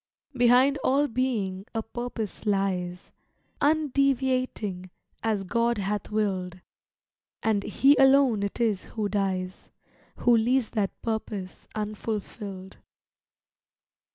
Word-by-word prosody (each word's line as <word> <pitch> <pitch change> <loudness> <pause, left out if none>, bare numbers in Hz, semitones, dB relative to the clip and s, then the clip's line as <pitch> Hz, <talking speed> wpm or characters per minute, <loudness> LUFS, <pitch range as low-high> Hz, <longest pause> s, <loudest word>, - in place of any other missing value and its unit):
Behind 255 +3 +4
all 280 +3 +3
being 220 -6 -2
a 225 - -1
purpose 225 -3 -5
lies, 185 -3 -1 0.5
Undeviating 265 - +1 0.3
as 215 -3 0
God 235 +4 +1
hath 205 0 -2
willed; 190 -4 -1 0.8
And 215 -2 +2
he 275 +7 +4
alone 270 -5 +5
it 200 +3 -3
is 220 -5 +1
who 215 -3 -3
dies, 190 -2 -2 0.5
Who 240 -1 +4
leaves 240 +2 +2
that 205 -4 -2
purpose 215 -4 -4
unfulfilled. 210 -2 -5
220 Hz, 100 wpm, -27 LUFS, 195-250 Hz, 0.8 s, alone